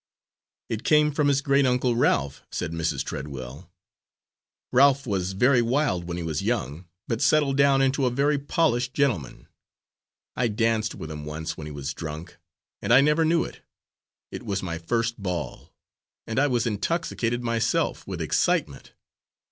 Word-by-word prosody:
"It 110 -1 -4
came 150 0 +4
from 150 0 +1
his 140 -1 +2
great 140 -1 +3
uncle 125 -1 +1
Ralph," 70 - +1
said - - -4
Mrs. 85 0 -1
Treadwell. 70 +3 -7 1.0
"Ralph 140 +1 +4
was 95 -4 -2
very 125 +5 +4
wild 120 - 0
when 85 0 -4
he 85 - -4
was 80 -2 -2
young, 95 - -2 0.2
but 115 -1 -2
settled 145 -3 +3
down 140 -1 +4
into 135 0 +2
a - - +3
very 140 +4 +1
polished 140 -4 0
gentleman. 125 - -1 0.9
I 125 - +1
danced 110 0 0
with 80 - -7
him 75 -1 -6
once 80 +2 -5
when 75 - -8
he - - -7
was 70 -1 -5
drunk, 80 +1 -7 0.4
and - - -2
I 125 +3 +8
never 150 +3 +3
knew 165 +1 +3
it - - -9 0.7
it - - -6
was 100 -5 -3
my 85 -2 -4
first 115 +6 -1
ball, 90 -3 -4 0.5
and 115 +3 -1
I 145 - +4
was 120 -4 0
intoxicated 120 - -1
myself, 115 -1 0
with - - -5
excitement. - - 0
115 Hz, 160 wpm, -25 LUFS, 85-140 Hz, 1.0 s, I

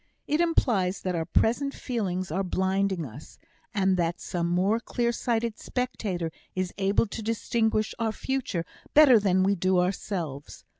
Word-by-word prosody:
It 300 +3 +1
implies 215 - +1
that 185 - -2
our 165 -2 -1
present 275 +5 +1
feelings 185 - -3
are 185 +4 0
blinding 190 -1 0
us, 130 +4 -11 0.3
and 190 -2 +2
that 170 0 0
some 170 -1 -2
more 185 +6 +2
clear 235 0 -1
sighted 230 -2 -1
spectator 215 -10 -3 0.2
is 185 -1 -2
able 195 +3 +3
to 225 +1 -6
distinguish 220 0 0
our 225 -1 +1
future 235 -8 -2 0.3
better 280 -6 +8
than 190 -2 +2
we 195 +1 +3
do 185 0 +1
ourselves. 180 -6 -3
195 Hz, 150 wpm, -27 LUFS, 180-230 Hz, 0.3 s, better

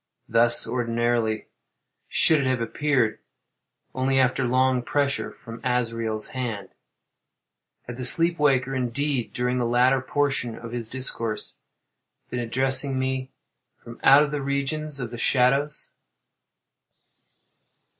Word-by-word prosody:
Thus, 120 +1 +4
ordinarily, 120 -2 -1 0.6
should 160 - +3
it 135 - -1
have 130 -1 0
appeared, 125 -1 -1 0.7
only 130 +1 0
after 130 0 +2
long 130 +1 +1
pressure 140 +2 -1
from 115 -1 -12
Azrael's 115 -3 -1
hand. 115 -7 -5 1.1
Had 120 0 -9
the 130 - -5
sleep 165 +6 +6
waker, 135 -3 +1
indeed, 130 0 -2
during 125 +1 -2
the - - 0
latter 125 +2 +2
portion 135 -4 -2
of 115 -1 -9
his 120 -2 -5
discourse, 115 -4 -3 0.7
been 125 - -3
addressing 130 +3 0
me 130 0 -2 0.5
from 115 0 -13
out 145 +2 +5
the 150 -1 -3
region 140 +2 -2
of 140 -6 -4
the 120 - -8
shadows? 140 +5 +2
130 Hz, 115 wpm, -24 LUFS, 120-135 Hz, 1.1 s, sleep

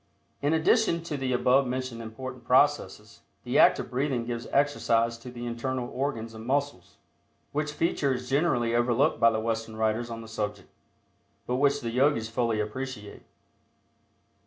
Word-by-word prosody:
In 145 +1 +1
addition 170 +2 +2
to 160 -3 -4
the 135 -2 -2
above 125 +2 +3
mentioned 125 -2 -4
important 125 +3 -8
processes 125 -6 +1 0.2
the - - +1
act - - +7
of - - -6
breathing 130 -2 -1
gives 120 -1 -4
exercise 115 -5 +1
to 125 - -9
the 120 -1 -7
internal 120 +1 -3
organs 120 -5 -3
and 110 0 -9
muscles, 130 -8 -2 0.5
which 150 0 -2
feature 150 -3 0
is 125 0 -6
generally 130 -5 +1
overlooked 120 +1 +2
by 115 0 +6
the 110 -1 -1
Western 110 0 -3
writers 110 +2 0
on 115 0 -6
the - - -11
subject, 105 -3 -4 0.8
but 125 - -1
which 140 +1 +2
the 115 - -3
Yogis 125 -3 +2
fully 115 -2 0
appreciate. 105 -1 -5
125 Hz, 160 wpm, -27 LUFS, 115-140 Hz, 0.8 s, act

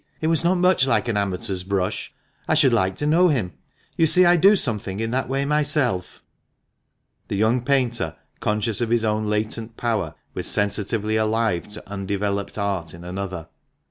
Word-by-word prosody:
It - - -4
was 165 0 +1
not 180 +2 +2
much 180 -6 +3
like 120 -1 +1
an 110 - -1
amateur's 95 -2 -1
brush. 95 0 -2 0.4
I - - +2
should 140 -5 +4
like 95 -4 +1
to 145 - -3
know 170 +4 +4
him. 115 - 0 0.4
You 165 - +3
see 180 +3 +7
I 175 0 +6
do 195 +5 +6
something 105 - -2
in 115 0 -2
that 130 +1 -1
way 135 +1 0
myself." 145 -10 0 1.0
The - - -3
young 110 +5 +2
painter, 125 -3 0 0.2
conscious 105 +1 0
of 120 - 0
his 115 -1 +1
own 110 0 0
latent 110 +2 -2
power, 110 -9 -2 0.2
was - - -4
sensitively 105 +1 0
alive 110 -4 0
to 105 - -7
undeveloped 100 0 -3
art 95 -6 -2
in 85 - -12
another. 90 -2 -6
110 Hz, 175 wpm, -23 LUFS, 100-135 Hz, 1.0 s, see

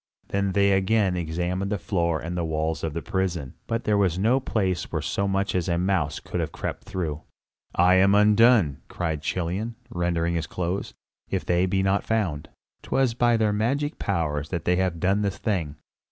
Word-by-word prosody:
Then 100 -1 0
they 100 0 +4
again 95 0 +2
examined 90 +3 -2
the 105 - +1
floor 85 -3 0
and 85 +2 -5
the 85 - -1
walls 80 0 -2
of 80 -2 -2
the 85 - -3
prison; 90 -9 -2
but 115 0 -1
there 105 -1 +2
was 90 -3 +2
no 115 +7 +3
place 95 -8 -1
where - - -1
so 100 - -1
much 95 +1 0
as 90 -1 0
a 85 - +1
mouse 90 -4 0
could - - -5
have - - -2
crept - - -5
through. 80 -5 -3 0.5
"I 90 +1 +5
am 100 +2 +5
undone!" 105 - +5
cried 80 -4 -3
Chilion, 95 +8 -2 0.2
rending 85 -1 0
his 80 -2 -2
clothes, 90 +2 -3 0.3
"if - - -2
they 90 +1 +2
be 95 +1 +1
not 95 +1 +1
found. 95 -10 -1 0.3
'Twas 130 -3 +1
by 120 0 +3
their 110 -2 +2
magic 135 +8 -1
powers 75 -6 -1
that 85 -3 -3
they 90 0 +2
have 90 -3 0
done 95 +4 +2
this 100 -2 -1
thing. 85 -10 -2
95 Hz, 190 wpm, -25 LUFS, 85-100 Hz, 0.5 s, I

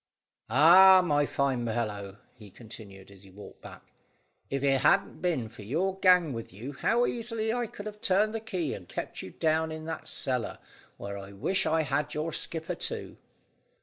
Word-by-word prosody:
"Ah, 185 +8 +8
my 145 -3 +2
fine 135 -3 0
fellow," 105 -4 -3 0.2
he 105 -4 -14
continued, 100 -2 -13
as 100 -1 -16
he 100 - -16
walked 100 +2 -13
back, - - -13 0.6
"if 135 0 -2
it 135 -2 +2
hadn't 195 +8 +2
been 160 -11 -1
for 110 -1 -13
your 180 - -2
gang 180 -6 +4
with 115 -1 -7
you, 115 +10 -8
how 235 - +1
easily 230 -2 -2
I 240 -1 -1
could 210 -2 -10
have 210 0 -8
turned 210 +2 +2
the 225 - -2
key 185 -9 -3
and 90 -3 -10
kept - - -5
you - - -8
down 160 - 0
in 155 0 -7
that 165 - -6
cellar, 125 -3 -2 0.4
where 100 0 -6
I 100 0 -10
wish 185 - 0
I 160 0 +2
had 145 0 -2
your 155 +1 -3
skipper 160 -1 -2
too." - - -5
150 Hz, 180 wpm, -28 LUFS, 110-185 Hz, 0.6 s, Ah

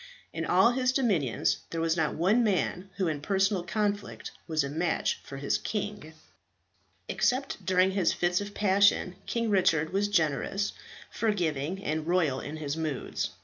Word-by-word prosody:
In - - -3
all 235 - +5
his 255 0 +1
dominions 185 - +1
there 165 - -4
was 165 0 +1
not 160 -3 0
one 200 +9 +3
man 195 -2 0
who 190 -3 0
in 150 -3 -2
personal 195 +2 +1
conflict 205 +2 -2 0.2
was 155 -3 +1
a - - -2
match 165 +4 -1
for 135 - -8
his 140 +1 0
king. 205 -6 -4 0.9
Except 260 +2 0
during 185 0 +3
his 190 -3 +2
fits 175 +2 +1
of 205 0 -7
passion, 200 -2 +3
King 230 -2 -1
Richard 175 -4 +2
was 200 +1 +2
generous, 195 +2 0 0.4
forgiving, 180 -4 -1
and 155 -1 -2
royal 165 -7 +2
in 150 +4 -6
his 145 -1 -3
moods. 155 -5 -3
180 Hz, 155 wpm, -28 LUFS, 155-205 Hz, 0.9 s, all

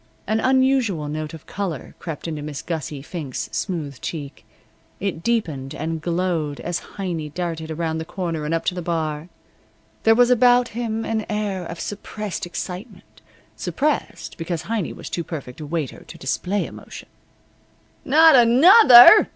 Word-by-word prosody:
An 215 +1 0
unusual 260 - +2
note 155 +1 -5
of 160 - -14
color 190 -8 -5
crept 165 -1 -6
into 155 -2 -4
Miss 145 -2 -6
Gussie 150 -4 -5
Fink's 150 -5 -5
smooth 155 -9 -4
cheek. 145 -4 -6 0.6
It 190 -4 -3
deepened 160 - -2
and 160 0 -3
glowed 170 -4 -1
as 175 0 -3 0.2
Heiny 170 -6 -3
darted 165 -1 -4
around 160 0 -2
the - - -3
corner 165 -3 -4
and 150 - -3
up 165 0 -1
to - - +1
the 180 - -4
bar. 160 -1 -3 0.7
There 225 0 +5
was 245 +1 +4
about 245 0 +5
him 225 -1 -3
an 220 -1 -2
air 205 -4 -2
of 170 0 -7
suppressed 205 -2 -5
excitement 180 +5 -8 0.3
suppressed, 295 -9 -2
because 165 0 -3
Heiny 220 -6 -2
was - - -9
too 170 - -3
perfect 145 -4 -7
a 150 - -6
waiter 155 -4 -4
to - - -11
display 185 +9 -1
emotion. - - -10 1.0
"Not 315 +2 +6
another!" 255 - +8
175 Hz, 150 wpm, -22 LUFS, 155-225 Hz, 1.0 s, another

